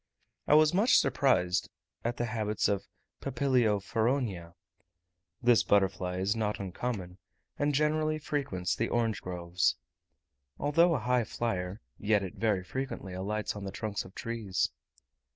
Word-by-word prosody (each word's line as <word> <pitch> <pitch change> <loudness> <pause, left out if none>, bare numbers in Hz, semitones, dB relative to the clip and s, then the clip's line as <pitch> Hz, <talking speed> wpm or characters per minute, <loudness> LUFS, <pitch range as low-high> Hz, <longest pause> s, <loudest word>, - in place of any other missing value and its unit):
I 150 - +6
was 155 +1 +6
much 220 +7 +5
surprised 90 -11 +2 0.3
at 120 +1 -2
the 120 - 0
habits 110 -2 0
of 100 -2 -1 0.3
Papilio 125 -6 +2
feronia. 105 -5 -1 0.9
This 120 -2 +6
butterfly 95 -2 +1
is 95 +4 +1
not 105 -2 -1
uncommon, 95 -1 -4 0.4
and 145 0 +2
generally 155 +1 +2
frequents 135 - -2
the 115 - -1
orange 115 -3 0
groves. 85 -3 0 0.8
Although 165 +4 +3
a - - 0
high 125 -2 +2
flier, 100 -3 -3 0.2
yet 105 -1 +2
it 95 - -5
very 105 -5 0
frequently 100 -3 -5
alights 105 +4 -2
on 105 - -6
the 95 - -4
trunks 105 +1 -3
of 95 - -14
trees. 115 -6 -1
110 Hz, 135 wpm, -30 LUFS, 95-125 Hz, 0.9 s, I